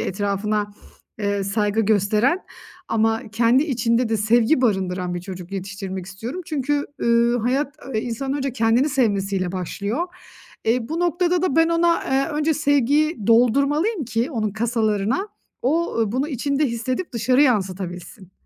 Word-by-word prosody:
etrafına, 205 +1 -1 0.5
eee, 200 -1 -1
saygı 210 +2 0
gösteren 215 - +2 0.5
ama 225 0 +1
kendi 235 +4 +4
içinde 240 -4 +1
de 225 - +1
sevgi 230 +6 +3
barındıran 185 -6 0
bir 175 - -3
çocuk 185 0 -9
yetiştirmek 195 -1 -5
istiyorum. 225 - -6
Çünkü, 290 -2 -1 0.2
ııı, 235 +1 +3
hayat, 265 +5 0
ııı, 265 -4 -4
insanın 245 +5 -3
önce 275 -2 -2
kendini 230 +4 +2
sevmesi 205 -8 0
ile 185 -1 -2
başlıyor. 200 - -3 0.6
Eee, 230 +1 +1
bu 325 +3 -2
noktada 350 0 +1
da 325 -5 0
ben 325 0 +5
ona, 335 0 +2
eee, 270 +2 +1
önce 305 +1 +1
sevgiyi 285 - +1
doldurmalıyım 280 - +3
ki 235 +4 -1
onun 220 -6 -1
kasalarına, 220 - 0 0.3
o, 325 +7 0
ııı, 225 -2 0
bunu 270 +4 -1
içinde 280 +1 0
hissedip 255 +7 -3
dışarı 255 +4 +3
yansıtabilsin. 190 -5 -2
235 Hz, 145 wpm, -22 LUFS, 205-280 Hz, 0.6 s, ben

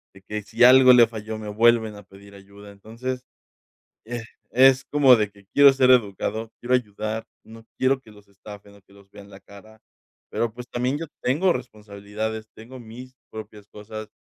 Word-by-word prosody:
de 95 - -16
que 105 +1 -6
si 110 - 0
algo 130 +1 +8
le 120 -1 +7
falló, 110 -1 -7
me 105 -1 -8
vuelven 110 0 +2
a 105 - -11
pedir 100 +1 -17
ayuda, 100 +1 -15
entonces, 115 +6 -7 0.9
eh, 120 0 -6 0.3
es 130 +1 +4
como 140 -3 +6
de 105 -2 -1
que 100 0 -21
quiero 140 -1 +7
ser 130 -1 +3
educado, 110 -1 0
quiero 125 +1 -1
ayudar, 110 -1 -3 0.2
no 115 0 -15
quiero 130 +1 +1
que 110 - -19
los 105 -1 -20
estafen, 100 +1 -14
o 100 - -20
que 100 - -26
los 100 -1 -21
vean 100 0 -14
la 95 - -14
cara, 105 +3 -17 0.5
pero, 115 -1 -2
pues, 125 0 -10
también 125 +3 -2
yo 165 - -6 0.2
tengo 155 +9 +1
responsabilidades, 110 0 -7
tengo 120 +4 -12
mis 125 +3 -12 0.2
propias 105 -1 -11
cosas, 110 +1 -10
110 Hz, 180 wpm, -23 LUFS, 105-125 Hz, 0.9 s, algo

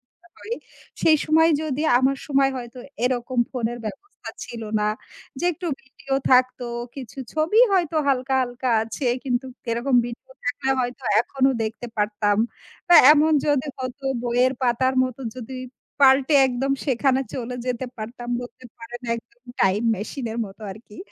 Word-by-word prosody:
ইচ্ছা 345 0 -25
করে 450 - -10 0.5
সেই 310 -1 +5
সময় 320 +1 +5
যদি 300 -2 -2 0.2
আমার 265 +1 +2
সময় 275 -1 +3
হয়তো 240 0 -8 0.2
এরকম 250 0 0
ফোনের 240 -2 -2
ব্যবস্থা 390 - -8 0.2
ছিল 230 -1 -8 0.2
না। 210 - +1 0.5
যে - - -4
একটু 350 +2 -8 0.2
ভিডিও 270 +1 -7 0.2
থাকতো। 255 -1 +3 0.3
কিছু 265 -1 -9 0.2
ছবি 320 +8 +2
হয়তো 340 -4 +1
হালকা, 265 0 +1
হালকা 245 +1 -2
আছে। 230 +4 -5 0.2
কিন্তু 255 0 -1 0.3
এরকম 245 +3 +1
ভিডিও 240 +2 -9
থাকলে 265 +2 -2
হয়তো 250 +2 -4 0.2
এখনো 265 +2 +1
দেখতে 225 +2 -5
পারতাম। 205 0 +1 0.5
বা 350 - +7 0.2
এমন 310 +1 +4
যদি 290 -1 +2
হতো 260 +2 -6 0.2
বইয়ের 245 +2 +2
পাতার 260 +1 +2
মত 255 -1 -4 0.2
যদি 255 +1 -8 0.5
পাল্টে 270 +2 +5
একদম 260 +2 -1
সেখানে 265 0 +2
চলে 250 -1 -4
যেতে 250 0 -2
পারতাম 240 +3 -7
বলতে 245 +1 -11
পারেন 235 +2 -9
একদম 235 +1 -13 0.2
টাইম 195 +3 +3
মেশিন 235 +5 -5
এর 230 - -5
মতো 195 +3 -13
আরকি। 210 +1 -13
255 Hz, 150 wpm, -23 LUFS, 240-275 Hz, 0.5 s, বা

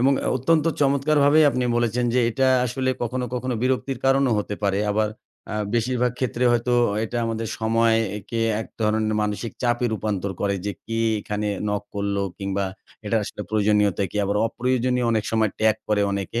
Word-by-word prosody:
এবং 135 +3 +4
অ - - +1
অত্যন্ত 155 +4 +2 0.2
চমৎকার 140 +2 +2
ভাবেই 150 +2 +6
আপনি 125 -2 -1
বলেছেন, 120 +1 +1
যে, 125 - +4
এটা 130 +2 +2 0.2
আসলে 130 +2 -1
কখনো, 125 +2 -2
কখনো 125 0 -2
বিরক্তির 130 0 0
কারণও 135 -2 +3
হতে 105 0 -3
পারে। 100 0 +1
আবার 105 0 +1 0.4
আ - - -3 0.2
বেশিরভাগ 125 +1 +1
ক্ষেত্রে 125 -1 -1
হয়তো 120 +1 +1 0.3
এটা 120 +2 -3
আমাদের 115 -1 -3
সময়কে 115 -1 +2
একে 115 +2 -4 0.2
এক - - -6 0.2
ধরনের 110 0 +1
মানসিক 105 +2 -3
চাপে 120 0 +1
রূপান্তর 100 -2 -2
করে, 100 -1 +1
যে, 105 - -1
কি 115 0 -3 0.2
এখানে 105 0 -3 0.2
নক 105 0 -1
করল, 100 0 -1 0.2
কিংবা 100 0 -2 0.4
এটা 115 - +1
আসলে 105 - -6
প্রয়োজনীয়তা 105 -2 +2
কি - - -7
আবার 100 +1 0
অপ্রয়োজনীয় 125 +1 0
অনেক 110 -1 0
সময় 110 -2 +2
ট্যাগ 110 0 +4
করে 105 -1 +2
অনেকে। 100 +4 -2
115 Hz, 175 wpm, -23 LUFS, 105-125 Hz, 0.4 s, ভাবেই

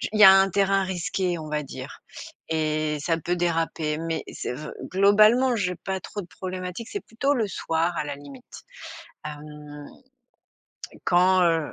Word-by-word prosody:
j - - -2
il 215 - -1
y - - +11
a 190 - +11
un 195 0 +5
terrain 195 0 +2
risqué 185 -1 -2
on 155 -1 -7
va 150 0 -1
dire 140 - -9 0.5
et 155 -1 0
ça 165 +2 0
peut 175 +3 -2
déraper. 165 -3 -1
Mais 165 0 -3
c'est - - -4
vr 150 +4 -7 0.2
globalement 215 +6 +5
j'ai 180 -5 -1
pas 190 +2 -4
trop 205 - -6
de - - -12
problématiques, 185 +5 -6
c'est 405 - -3
plutôt 275 +6 0
le 225 -5 0
soir 170 -2 -1
à - - 0
la 145 -1 -5
limite. 145 - -13 0.6
Hem. 150 -1 -9 1.2
Quand, 185 +1 +4
heu 165 -3 +1
175 Hz, 170 wpm, -25 LUFS, 155-195 Hz, 1.2 s, y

